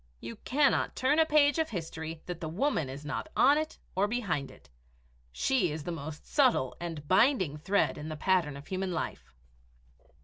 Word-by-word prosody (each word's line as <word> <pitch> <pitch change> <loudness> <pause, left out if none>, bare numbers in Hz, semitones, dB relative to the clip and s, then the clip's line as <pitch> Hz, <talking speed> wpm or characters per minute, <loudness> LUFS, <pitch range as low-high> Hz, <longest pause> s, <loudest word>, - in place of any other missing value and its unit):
You 115 0 -8
cannot 280 +1 +1
turn 275 +4 +2
a 320 - +5
page 295 0 +4
of 320 - +1
history 160 -4 -6
that 175 -2 -6
the 160 - -3
woman 170 - 0
is 140 +3 -8
not 155 - -4
on 285 +4 +6
it 310 0 -4 0.2
or 195 +2 +2
behind 200 - -2
it. - - -17 0.6
She 190 - +1
is 150 0 -5
the 175 - -4
most 155 -2 -7
subtle 240 - +2
and 165 -4 -6
binding 190 - +3
thread 190 +7 0
in 150 +1 -6
the 155 - -5
pattern 165 -4 +1
of 140 - -11
Human 185 +1 -3
Life! 165 - -4
180 Hz, 180 wpm, -30 LUFS, -, 0.6 s, on